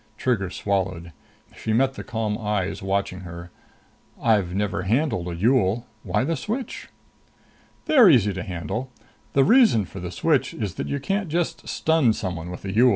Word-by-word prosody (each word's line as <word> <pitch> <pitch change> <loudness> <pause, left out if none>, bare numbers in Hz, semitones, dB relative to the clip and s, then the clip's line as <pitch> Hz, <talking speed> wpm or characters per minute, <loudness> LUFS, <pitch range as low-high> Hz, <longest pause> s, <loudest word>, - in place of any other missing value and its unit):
Trigger 110 -8 0
swallowed. 90 -4 -2 0.4
She 110 - -2
met 135 +3 +2
the - - -7
calm 110 -2 -2
eyes 105 -3 -2
watching 95 -1 -1
her. 85 -1 -9 0.7
"I've 100 -6 +2
never 100 -1 -1
handled 110 - 0
a 85 - -4
Yool. 115 +2 +2 0.2
Why - - 0
the 165 +5 0
switch?" 225 - -5 1.0
"They're 250 -10 +7
easy 110 - +4
to 95 - -4
handle. 95 +8 -4 0.4
The 135 - +5
reason 220 - +5
for 95 - -9
the 90 -1 -5
switch 135 - +1
is 105 -6 -3
that - - -4
you 140 - -2
can't 195 +6 -2
just 170 +2 -2
stun 160 -8 +2
someone 90 -5 -4
with 90 +2 -8
a 95 - -3
Yool. 120 +4 +6
105 Hz, 165 wpm, -24 LUFS, 95-135 Hz, 1.0 s, They're